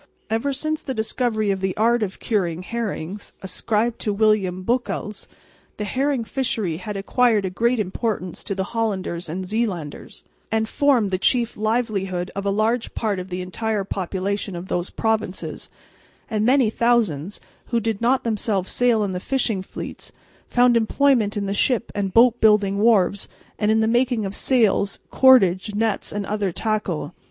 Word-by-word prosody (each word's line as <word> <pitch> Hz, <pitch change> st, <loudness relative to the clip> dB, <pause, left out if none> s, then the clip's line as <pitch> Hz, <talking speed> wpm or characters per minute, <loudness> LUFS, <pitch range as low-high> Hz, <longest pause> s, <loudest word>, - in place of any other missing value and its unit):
Ever 225 Hz, +6 st, 0 dB
since 310 Hz, +3 st, -2 dB
the 265 Hz, -, -4 dB
discovery 220 Hz, -1 st, 0 dB
of 190 Hz, -1 st, -2 dB
the 190 Hz, -1 st, -2 dB
art 235 Hz, +2 st, +3 dB
of 195 Hz, -3 st, -3 dB
curing 180 Hz, -6 st, -1 dB
herrings 205 Hz, -4 st, -5 dB
(ascribed 225 Hz, +4 st, -1 dB
to 210 Hz, -, -1 dB
William 200 Hz, -3 st, +1 dB
Beukelsz), 230 Hz, -2 st, -2 dB, 0.5 s
the 210 Hz, -, -3 dB
herring 260 Hz, +4 st, 0 dB
fishery 220 Hz, -9 st, -2 dB
had 200 Hz, +3 st, -5 dB
acquired 220 Hz, +1 st, +2 dB
a 185 Hz, -, -2 dB
great 235 Hz, +5 st, +1 dB
importance 190 Hz, -2 st, -3 dB
to 195 Hz, -, -3 dB
the 190 Hz, -, -1 dB
Hollanders 190 Hz, -7 st, -2 dB
and 185 Hz, +4 st, -4 dB
Zeelanders, 195 Hz, -8 st, -3 dB, 0.3 s
and 220 Hz, 0 st, +1 dB
formed 250 Hz, -7 st, +2 dB
the 185 Hz, -, 0 dB
chief 240 Hz, +3 st, +2 dB
livelihood 210 Hz, -5 st, -1 dB
of 200 Hz, 0 st, -3 dB
a -, -, +3 dB
large 220 Hz, +4 st, 0 dB
part 210 Hz, -4 st, -1 dB
of 180 Hz, +1 st, -7 dB
the 180 Hz, 0 st, -3 dB
entire 210 Hz, +3 st, -2 dB
population 195 Hz, +1 st, -3 dB
of 175 Hz, +2 st, -7 dB
those 175 Hz, +1 st, -1 dB
provinces; 220 Hz, -4 st, -2 dB, 0.6 s
and 215 Hz, -1 st, 0 dB
many 250 Hz, -1 st, +4 dB
thousands, 210 Hz, -8 st, +1 dB, 0.3 s
who 235 Hz, -, +1 dB
did 225 Hz, -2 st, -2 dB
not 250 Hz, +3 st, +2 dB
themselves 210 Hz, -4 st, -1 dB
sail 240 Hz, -3 st, +3 dB
in 200 Hz, -, -1 dB
the 180 Hz, -, -3 dB
fishing 235 Hz, -3 st, 0 dB
fleets, 190 Hz, -, -8 dB, 0.4 s
found 245 Hz, -1 st, +4 dB
employment 230 Hz, -2 st, +2 dB
in 200 Hz, -, -1 dB
the 195 Hz, -, -1 dB
ship 235 Hz, +2 st, +1 dB
and 200 Hz, -2 st, -2 dB
boat 235 Hz, +3 st, +5 dB
building 205 Hz, -2 st, +4 dB
wharves 205 Hz, -3 st, +3 dB, 0.3 s
and 210 Hz, 0 st, +1 dB
in 220 Hz, 0 st, +3 dB
the 220 Hz, -, +2 dB
making 240 Hz, -1 st, +1 dB
of 195 Hz, +1 st, -4 dB
sails, 220 Hz, -6 st, +2 dB
cordage, 210 Hz, -6 st, +5 dB
nets 220 Hz, 0 st, 0 dB
and 205 Hz, -1 st, -3 dB
other 205 Hz, -2 st, -1 dB
tackle. 185 Hz, -6 st, -2 dB
215 Hz, 165 wpm, -22 LUFS, 190-235 Hz, 0.6 s, boat